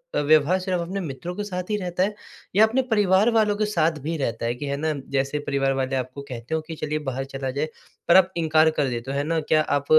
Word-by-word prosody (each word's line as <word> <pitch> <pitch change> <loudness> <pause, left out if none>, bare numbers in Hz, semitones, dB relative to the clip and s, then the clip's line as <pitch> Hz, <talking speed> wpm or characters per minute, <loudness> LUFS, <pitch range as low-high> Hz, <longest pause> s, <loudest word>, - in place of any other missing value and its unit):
अ, - - +2
व्यवहार 155 +5 +4
सिर्फ़ 185 -2 -1
अपने 185 +4 -3
मित्रों 165 0 -5
के 205 - -3
साथ 180 -3 -4
ही 210 - +1
रहता 180 -1 -1
है, 210 - 0 0.4
या 215 +2 +7
अपने 250 +4 +1
परिवार 205 0 +4
वालों 215 -2 +3
के 215 - +1
साथ 165 -6 +1
भी 165 +2 -2
रहता 115 -4 -2
है 120 - 0
कि 145 +4 -6
है 140 - -1
ना 155 +1 0 0.2
जैसे 135 +2 0
परिवार 135 -1 +1
वाले 135 0 -1
आपको 130 +2 -4
कहते 120 +4 -4
हो 160 - -1
कि 165 - -6
चलिए 155 0 -2
बाहर 135 +1 -3
चला 135 -1 -3
जाए, 140 +4 -1 0.4
पर 170 - +6
आप 185 0 +4
इनकार 160 -1 +4
कर 140 - +2
देते 120 +2 -4
हो, 140 - -2
है 140 - 0
ना 165 +2 0
क्या 155 0 +2
आप 145 -2 0
155 Hz, 260 wpm, -24 LUFS, 135-185 Hz, 0.4 s, या